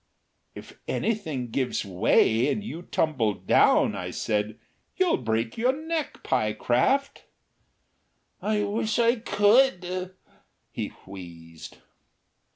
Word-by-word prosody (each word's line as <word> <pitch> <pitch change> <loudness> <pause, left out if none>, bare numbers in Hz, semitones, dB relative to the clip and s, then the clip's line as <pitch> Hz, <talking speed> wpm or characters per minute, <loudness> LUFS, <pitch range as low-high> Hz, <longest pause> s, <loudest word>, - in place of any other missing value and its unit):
"If - - -12
anything 155 - -2
gives 130 -3 -1
way 110 +6 +3
and 210 - -2
you 175 -6 -6
tumble 130 - 0
down," - - +3
I - - -4
said, 105 +1 -2 0.4
"you'll 370 -2 +2
break 115 - -2
your 250 +3 +3
neck, 315 +1 -4
Pyecraft." 120 - 0 1.2
"I 210 0 0
wish 215 +1 -1
I 235 +1 +3
could," 200 -5 +2 0.6
he - - -3 0.2
wheezed. 85 -4 -11
165 Hz, 100 wpm, -26 LUFS, -, 1.2 s, way